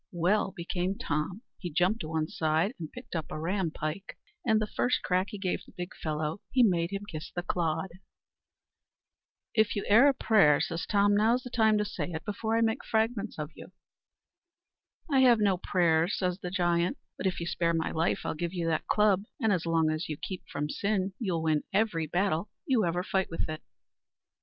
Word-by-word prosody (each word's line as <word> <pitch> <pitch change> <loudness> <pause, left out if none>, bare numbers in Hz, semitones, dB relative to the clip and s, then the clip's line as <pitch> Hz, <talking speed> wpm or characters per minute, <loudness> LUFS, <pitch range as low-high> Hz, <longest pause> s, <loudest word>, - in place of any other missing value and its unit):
Well 190 +4 +2
become 180 +3 -2
Tom, 155 - -2 0.2
he 180 - -4
jumped 180 +8 +2
a - - -5
one 160 -1 -1
side, 160 +8 0
and 160 -2 -6
picked 250 -6 -9
up 160 -2 -2
a - - -5
ram 180 +2 0
pike; 155 +5 -5 0.3
and 220 -2 +3
the 215 - 0
first 245 +3 0
crack 185 +1 +1
he 210 - -6
gave 190 -2 -2
the - - -18
big 180 -2 -6
fellow, 155 +2 -3
he 255 -2 +4
made 170 -6 +2
him 200 0 -3
kiss 160 -4 -7
the 175 - -4
clod. 175 +1 -1 1.6
"If 220 -2 +2
you 205 - -1
have - - -4
e'er 240 +7 +8
a 280 - +4
prayer," 195 -13 +5
says 165 0 -2
Tom, 205 0 +3
"now's 230 +4 +3
the 250 - -8
time 220 -3 +4
to 210 - +1
say 200 - -4
it, 160 +1 -5
before 220 +2 -1
I - - +2
make 225 -1 +1
fragments 220 -1 -1
of 150 0 -4
you." 185 - -12 1.4
"I 270 - +4
have 250 -3 +6
no 200 -3 +2
prayers," 170 -1 +2
says 180 0 -1
the 180 -3 -5
giant; 175 -2 +1 0.2
"but 190 - -2
if 185 - -1
you 170 - -3
spare 170 -1 0
my 160 - -1
life 160 +1 0
I'll - - -1
give 170 +2 -3
you 170 -2 -1
that 155 -1 -1
club; 205 -2 +3
and 220 -5 +2
as 170 -2 -1
long 165 -1 +2
as 155 +2 -3
you 155 - -3
keep 185 +3 -5
from 145 +1 -2
sin, 195 +3 -1
you'll 180 -8 -1
win 155 -2 +2
every 190 -6 +1
battle 175 +2 0 0.2
you 255 - +2
ever 175 +1 0
fight 190 0 0
with 165 - -2
it." 155 0 -5
180 Hz, 205 wpm, -29 LUFS, 165-210 Hz, 1.6 s, e'er